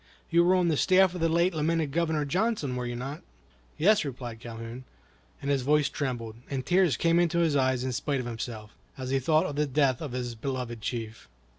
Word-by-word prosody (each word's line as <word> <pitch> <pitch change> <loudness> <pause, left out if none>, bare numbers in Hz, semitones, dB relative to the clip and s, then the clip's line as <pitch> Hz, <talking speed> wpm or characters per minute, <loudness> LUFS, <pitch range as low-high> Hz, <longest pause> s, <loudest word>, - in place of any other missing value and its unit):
You 170 +1 +5
were 180 +2 +4
on 180 -2 +2
the 155 - +1
staff 185 +2 +4
of 180 - -5
the 165 - +3
late 170 +3 +2
lamented 160 -1 0
Governor 160 -1 0
Johnson, 180 - 0
were 125 -1 -3
you 120 - -4
not?" 135 +5 -5 0.6
"Yes," 205 +5 +4
replied 125 -5 -6
Calhoun; 115 +2 -8 0.6
and 140 - 0
his 140 -2 +2
voice 150 +2 +2
trembled, 120 -5 -4
and 135 -2 -3
tears 180 -7 +3
came 170 0 +3
into 170 -1 +2
his 165 -3 +2
eyes 130 -2 +2
in 130 - -1
spite 140 +2 -1
of 125 - -4
himself, 115 -2 -6 0.3
as 130 -1 -4
he 135 - +2
thought 155 +4 +2
of 145 - -4
the 150 0 +1
death 135 -1 +2
of 145 -6 -5
his 125 -1 -3
beloved 120 -1 -4
chief. 110 - -5
140 Hz, 210 wpm, -28 LUFS, 125-165 Hz, 0.6 s, You